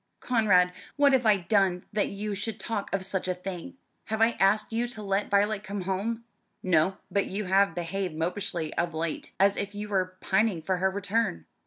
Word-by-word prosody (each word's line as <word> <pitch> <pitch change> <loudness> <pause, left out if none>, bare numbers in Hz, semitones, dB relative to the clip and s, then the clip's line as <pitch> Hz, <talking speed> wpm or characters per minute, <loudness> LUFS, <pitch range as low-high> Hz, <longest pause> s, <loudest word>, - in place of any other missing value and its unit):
"Conrad, 195 -7 +3 0.2
what 285 -1 +5
have 250 -3 +3
I 210 -2 +6
done 190 -1 +1
that 210 -1 +2
you 205 +1 -4
should 205 +1 -4
talk 205 +1 -3
of 195 -1 0
such 190 -1 -1
a 185 - 0
thing? 185 +8 -7 0.3
Have 220 0 -2
I 225 +1 +5
asked 210 +3 +3
you 235 +2 0
to 225 -3 -8
let 195 +1 0
Violet 205 +1 +2
come 200 -1 -4
home?" 200 +5 -2 0.4
"No, 185 +1 +2
but 200 - +1
you 205 +2 -3
have 195 -1 +3
behaved 175 0 -3
mopishly 170 -1 -2
of 170 -1 -1
late, 160 0 -3
as 195 +1 +4
if 200 0 -3
you 210 0 -5
were 185 -2 -1
pining 195 -1 +1
for 180 +4 -1
her 190 +1 +2
return." 200 - -1
195 Hz, 195 wpm, -28 LUFS, 185-210 Hz, 0.4 s, I